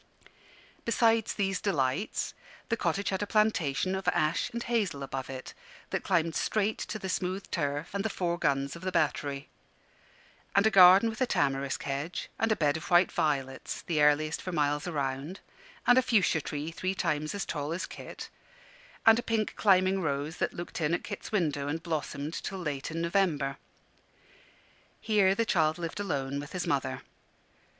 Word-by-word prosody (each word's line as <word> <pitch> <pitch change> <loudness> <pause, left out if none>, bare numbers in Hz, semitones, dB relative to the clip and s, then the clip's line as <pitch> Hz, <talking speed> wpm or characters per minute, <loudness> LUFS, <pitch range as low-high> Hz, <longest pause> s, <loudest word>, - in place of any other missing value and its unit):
Besides 230 -1 +2
these 195 -2 -1
delights, 160 -2 -1 0.4
the 230 - +2
cottage 195 -1 -1
had 190 0 -1
a 205 - -1
plantation 190 -7 +1
of 190 0 -4
ash 155 +2 +1
and 235 0 -4
hazel 205 -12 -1
above 135 -1 -5
it, 130 -1 -7 0.4
that - - -1
climbed 165 -3 +1
straight 215 +4 0
to 215 - -4
the 195 - -5
smooth 185 +1 -2
turf 145 0 -2
and 200 0 -1
the 220 - 0
four 175 -3 -2
guns 140 +1 0
of 170 - -10
the 185 0 -2
Battery; 145 -4 0 1.1
and 200 +2 +5
a 220 - +4
garden 190 +3 +8
with 225 +1 -5
a 255 - +3
tamarisk 140 -7 0
hedge, 140 +5 -4
and 225 0 +2
a - - +4
bed 150 -4 +1
of 160 - -8
white 175 0 +5
violets, 135 -3 -2
the 155 -3 0
earliest 150 +1 +3
for 185 - -5
miles 150 -1 0
around, 145 +3 -3 0.5
and 245 +1 +6
a - - +4
fuchsia 200 -10 +2
tree 150 +3 -4
three 185 +3 -2
times 155 -2 -1
as 200 - -2
tall 150 -1 -3
as 170 +3 -2
Kit, - - -9 0.7
and 225 +1 +7
a - - 0
pink 225 -2 -1
climbing 190 -1 +3
rose 145 0 -2
that - - 0
looked 175 0 -6
in 160 +2 +2
at - - -5
Kit's - - -7
window 150 -9 0
and 160 +3 -3
blossomed 155 -2 -3
till 195 - -4
late 145 -6 -3
in 165 +1 -3
November. 170 -6 +1 1.4
Here 200 -3 +3
the 230 - +1
child 160 -6 +2
lived 170 +2 -5
alone 140 -8 -2
with 145 +1 -8
his 180 -2 -2
mother. 135 -2 -1
170 Hz, 175 wpm, -29 LUFS, 145-195 Hz, 1.4 s, garden